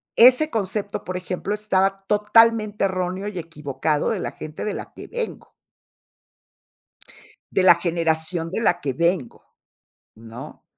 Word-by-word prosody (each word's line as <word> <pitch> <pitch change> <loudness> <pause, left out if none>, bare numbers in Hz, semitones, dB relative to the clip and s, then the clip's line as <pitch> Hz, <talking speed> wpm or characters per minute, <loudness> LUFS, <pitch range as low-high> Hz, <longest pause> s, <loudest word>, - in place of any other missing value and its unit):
ese 255 +6 +6
concepto, 200 -3 -3
por 185 0 -4
ejemplo, 185 +2 -4
estaba 195 -2 0
totalmente 215 0 +3
erróneo 185 +1 -2
y 200 -4 -4
equivocado 150 -2 -2
de 220 - -1
la - - -3
gente 155 0 -8
de 210 - -2
la - - -7
que - - -10
vengo. 475 -1 -6 2.0
De 190 - +2
la 180 -2 +8
generación 165 0 -1
de 190 - -3
la - - +2
que 135 -2 -2
vengo, 170 -3 -1 0.7
¿no? 115 +6 -11
185 Hz, 135 wpm, -23 LUFS, 165-210 Hz, 2.0 s, la